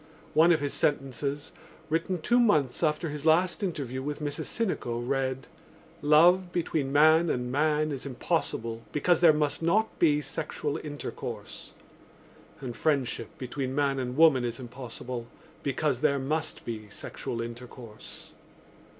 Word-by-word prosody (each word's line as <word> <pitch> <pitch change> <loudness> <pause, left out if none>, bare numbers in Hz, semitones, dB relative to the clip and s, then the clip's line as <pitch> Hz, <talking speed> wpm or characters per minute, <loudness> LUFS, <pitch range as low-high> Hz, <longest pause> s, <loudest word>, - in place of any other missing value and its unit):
One 165 +3 +6
of 160 -3 +3
his 145 -1 -2
sentences, 140 +1 -1 0.4
written 165 +3 -1
two 240 +1 +3
months 155 - +2
after 155 0 +1
his 150 -1 -6
last 170 +5 +3
interview 140 - -3
with 145 +2 -3
Mrs 145 -1 -3
Sinico, 185 - -2
read: 130 +1 -1 0.6
Love 175 +5 +5
between 160 -5 -1
man 155 +3 +5
and 125 -2 -1
man 150 +2 +1
is 135 -3 -4
impossible 125 -5 -2
because 170 +3 +2
there 170 -2 +8
must 150 0 0
not 210 +7 +1
be 150 -3 +4
sexual 150 -1 -3
intercourse 145 -1 -7 0.9
and 125 -3 -5
friendship 135 -7 -1
between 130 +1 -4
man 140 -1 +1
and 125 0 -4
woman 155 -6 +6
is 120 0 -3
impossible 125 -1 -7 0.3
because 140 -1 -1
there 145 -2 +3
must 155 +4 -3
be 110 -3 -6
sexual 115 +3 -6
intercourse. 115 -1 -9
145 Hz, 135 wpm, -28 LUFS, 130-160 Hz, 0.9 s, there